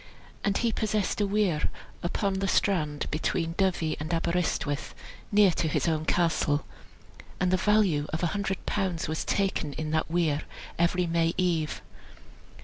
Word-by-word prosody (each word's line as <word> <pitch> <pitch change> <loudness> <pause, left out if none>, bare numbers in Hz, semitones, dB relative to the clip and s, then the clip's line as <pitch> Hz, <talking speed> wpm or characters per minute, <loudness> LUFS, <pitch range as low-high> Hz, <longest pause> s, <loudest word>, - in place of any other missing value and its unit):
And 200 -1 +2
he 235 -1 +1
possessed 215 -1 0
a 205 - +2
weir 195 -6 +1 0.3
upon 190 +2 -1
the 195 - 0
strand 155 -8 +1
between 165 +2 -1
Dyvi 175 -4 0
and 155 +3 -4
Aberystwyth, 165 -4 -1 0.4
near 205 -2 +6
to 165 - -1
his 155 - 0
own 155 -1 0
castle, 160 -4 +1 0.7
and 180 0 +2
the - - +5
value 185 -6 +2
of 160 +3 -2
an 170 - +2
hundred 195 0 -2
pounds 185 -5 -1
was 155 +1 -2
taken 190 -7 0
in 155 +1 -4
that 160 0 0
weir 160 -3 +1 0.4
every 175 +1 +2
May 165 0 +1
eve. 170 -4 0
175 Hz, 150 wpm, -28 LUFS, 155-195 Hz, 0.7 s, near